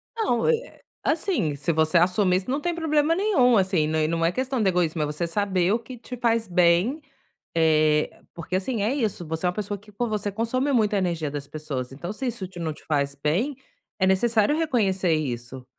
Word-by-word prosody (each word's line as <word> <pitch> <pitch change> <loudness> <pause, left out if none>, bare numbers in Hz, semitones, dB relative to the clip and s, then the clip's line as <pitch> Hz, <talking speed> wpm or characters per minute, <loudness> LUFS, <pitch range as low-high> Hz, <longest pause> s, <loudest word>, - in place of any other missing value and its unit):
Não, 420 - +1
eh, 475 +1 -1 0.2
assim, 310 - 0
se 150 +4 -1
você 160 +2 +3
assumir 180 +1 +3
isso 190 +6 -5
não 280 - 0
tem 345 +1 -1
problema 315 -1 +2
nenhum, 305 - +3
assim, 185 -5 +2
não 155 0 0
e 155 - +2
não 165 0 -1
é 170 - +3
questão 260 +1 -2
de 195 - +3
egoísmo, 170 -3 0
é - - +2
você 150 +3 -2
saber 190 0 +1
o 230 - +1
que 245 +2 -10
te 250 +1 -8
faz 230 -2 +1
bem, 180 - +3 0.5
eh, 155 -2 +3 0.2
porque, 170 +2 -5
assim, 205 +3 -1
é 230 +6 +1
isso, 215 - -2
você 160 +3 -3
é - - +4
uma - - -3
pessoa 205 -1 -3
que 210 +2 -18
poxa, 235 +3 -2
você 205 -1 -1
consome 255 +6 -1
muita 215 -5 +2
energia 170 -6 -1
das 145 -1 -5
pessoas, 140 -4 -5
então 170 +8 -6
se 260 +4 -4
isso 195 -5 -4
te 175 -1 -11
não 160 -2 -2
te - - -17
faz 140 -2 0
bem, 175 - 0 0.4
é 190 - +3
necessário 220 +6 +3
reconhecer 195 - +1
isso. 125 -3 -4
190 Hz, 215 wpm, -25 LUFS, 160-240 Hz, 0.5 s, é